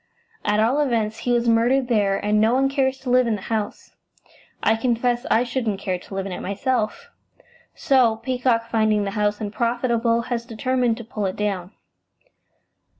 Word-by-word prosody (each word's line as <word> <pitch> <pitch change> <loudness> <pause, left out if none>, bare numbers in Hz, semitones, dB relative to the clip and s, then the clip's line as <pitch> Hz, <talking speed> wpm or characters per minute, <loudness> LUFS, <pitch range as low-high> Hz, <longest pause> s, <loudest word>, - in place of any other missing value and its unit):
"At 210 0 +1
all 235 +7 +2
events, 225 -6 0
he 245 +2 -2
was 240 0 +1
murdered 240 +3 +3
there, 205 -5 +2
and 210 +1 +1
no 225 +3 +3
one 270 +1 +2
cares 270 -1 0
to 255 -2 -3
live 250 -1 +4
in 225 - +1
the 195 - -8
house. 215 -2 -4 0.7
I 220 - +4
confess 240 +1 0
I 230 - +3
shouldn't 235 -5 -2
care 185 -2 -2
to 195 - -10
live 195 0 -2
in 195 - -5
it - - -5
myself. 215 +3 -2 0.6
So, 255 -7 +3
Peacock, 245 -1 0
finding 215 -2 +2
the 200 - -3
house 210 0 0
unprofitable, 235 +2 0
has 235 0 -3
determined 240 0 0
to 235 - -7
pull 210 -3 -3
it 185 - -4
down." 195 -3 -3
230 Hz, 175 wpm, -22 LUFS, 210-245 Hz, 0.7 s, live